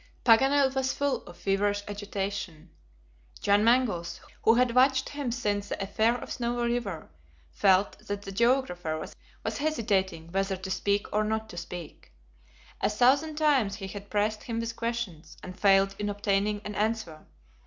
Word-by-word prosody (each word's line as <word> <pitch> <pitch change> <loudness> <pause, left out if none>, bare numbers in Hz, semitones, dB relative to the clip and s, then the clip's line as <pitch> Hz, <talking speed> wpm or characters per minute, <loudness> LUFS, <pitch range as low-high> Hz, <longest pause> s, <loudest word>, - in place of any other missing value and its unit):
Paganel 270 +3 +5
was 265 -1 0
full 285 -1 0
of 175 - -11
feverish 205 +2 0
agitation. 200 -5 -5 0.7
John 205 +1 +3
Mangles, 215 -8 +2 0.2
who 225 - +5
had 245 -1 +3
watched 260 +1 +4
him 285 -4 -3
since 205 -4 -2
the - - -3
affair 220 +4 +1
at - - -8
Snowy 240 0 -1
River, 200 -10 -4 0.4
felt 195 - +3
that 205 0 -4
the 195 - -7
geographer 195 -8 +1 0.5
was - - -2
hesitating 195 - -1
whether 195 +1 0
to 190 +1 -6
speak 200 +2 0
or 210 +1 +2
not 220 +1 -2
to - - -10
speak. 175 -1 -8 0.7
A - - +2
thousand 275 +8 +3
times 280 -10 +2
he 200 -2 -7
had 200 +1 -9
pressed 210 +1 0
him 230 -1 -3
with 230 0 -3
questions, 215 -10 -4
and 185 0 -9
failed 195 -1 +4
in 205 0 -1
obtaining 205 0 0
an 210 - -4
answer. 210 -7 -2
205 Hz, 155 wpm, -28 LUFS, 195-240 Hz, 0.7 s, Paganel